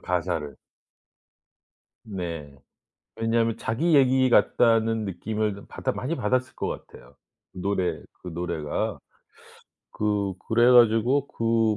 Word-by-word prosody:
가사를. 85 -4 -2 1.5
네. 85 -8 -6 0.6
왜냐하면 115 0 +1
자기 155 +9 0
얘기 130 -1 +4
같다는 115 -2 +3
느낌을 105 +3 -2
그 100 - -12
받아 - - -3
많이 140 +6 -3
받았을 130 -2 -1
것 - - -3 0.2
같아요 - - -17 0.4
노래 95 0 -2 0.2
그 90 - -7
노래가. 85 -3 -3 1.0
그 105 -2 0
그래 120 +2 +5
가지고 120 +4 +4
그 115 -2 +1
110 Hz, 220 characters per minute, -25 LUFS, 90-120 Hz, 1.5 s, 그래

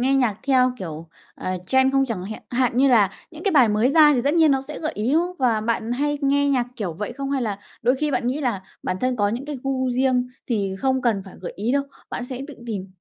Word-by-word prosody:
nghe 265 +2 +2
nhạc 245 -6 +2
theo, 255 -2 +3
kiểu, 165 -2 -7 0.3
ờ, - - -5 0.2
trend 265 +4 +3
không? 270 0 +3
Chẳng 195 -6 -4
hẹn 215 +2 -7
hạn 245 -1 +1
như 270 +1 +5
là 210 -6 +5 0.2
những 320 +1 -11
cái 395 - +2
bài 255 -7 +6
mới 215 +5 +2
ra 300 -1 +7
thì 240 - +1
tất 285 +4 +1
nhiên 320 -2 +5
nó 270 -1 +2
sẽ 300 +3 -8
gợi 315 0 -3
ý, 225 +6 -1
đúng 330 +2 +4
không? 360 0 -9
Và 235 -4 +2
bạn 230 +1 -1
hay 290 +3 0
nghe 285 +1 +2
nhạc 250 -3 +1
kiểu 195 -7 -3
vậy 210 +7 -5
không, 275 +1 -4
hay 270 -3 0
là 205 -3 -2 0.2
đôi 250 +2 +3
khi 300 +1 -1
bạn 245 -2 -1
nghĩ 270 +5 -1
là 230 -8 -1 0.2
bản 185 - -2
thân 255 0 0
có 205 -1 +2
những 240 +6 -3
cái 290 -3 -5
gu 260 -1 0
riêng 250 0 +1 0.2
thì 200 -5 -1
không 265 +2 +1
cần 215 -5 +1
phải 190 - -12
gợi 180 - -6
ý 220 +6 -1
đâu, 280 0 +2 0.3
bạn 245 - -4
sẽ 255 0 -6
tự 290 - -8
tìm? 200 -4 -4
255 Hz, 270 wpm, -23 LUFS, 220-275 Hz, 0.3 s, ra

